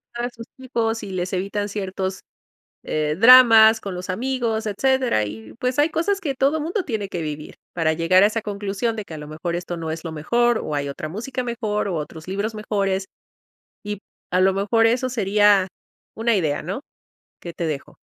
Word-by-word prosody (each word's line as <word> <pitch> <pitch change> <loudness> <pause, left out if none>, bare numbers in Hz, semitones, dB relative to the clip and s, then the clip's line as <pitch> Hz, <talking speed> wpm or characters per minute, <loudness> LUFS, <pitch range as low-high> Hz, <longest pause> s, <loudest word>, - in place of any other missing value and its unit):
a 240 +1 -2
sus 230 -2 -11
hijos, 230 -3 -2
y 200 - -6
les 180 0 -3
evitan 200 +2 -2
ciertos, 190 -2 -4 0.6
eh, 150 0 -1
dramas 225 -2 +8
con 195 -2 -5
los 180 +1 -7
amigos, 230 +1 -1
etcétera. 250 - +1
Y, 110 +1 -9
pues, 250 0 -1
hay 295 +2 +4
cosas 385 +5 0
que 280 -6 -2
todo 285 +4 +1
mundo 355 +5 -2
tiene 215 -6 -3
que 170 - -4
vivir. 150 -1 -6 0.2
Para 165 -2 +1
llegar 180 +4 +4
a - - +7
esa 220 +1 -2
conclusión 205 +2 -2
de 215 - -4
que 170 - -11
a - - -7
lo 150 0 -8
mejor 165 +3 -4
esto 175 0 -5
no 165 -1 -4
es 165 +2 -6
lo 160 - -4
mejor, 235 +9 +1
o 150 - -4
hay 140 -1 -1
otra 155 +2 -5
música 250 - -4
mejor, 220 -4 -2
u 180 - -2
otros 155 +1 -6
libros 205 +3 -2
mejores, 195 -3 -1 0.8
y 205 -1 -4 0.3
a 180 - +3
lo 190 +1 +4
mejor 210 +4 +2
eso 250 +2 +1
sería 205 -3 +3 0.5
una 230 0 +1
idea, 155 -6 0
¿no? 195 - -5 0.6
Que 170 - -7
te 170 - -3
dejo. 150 -3 -5
205 Hz, 195 wpm, -22 LUFS, 175-235 Hz, 0.8 s, dramas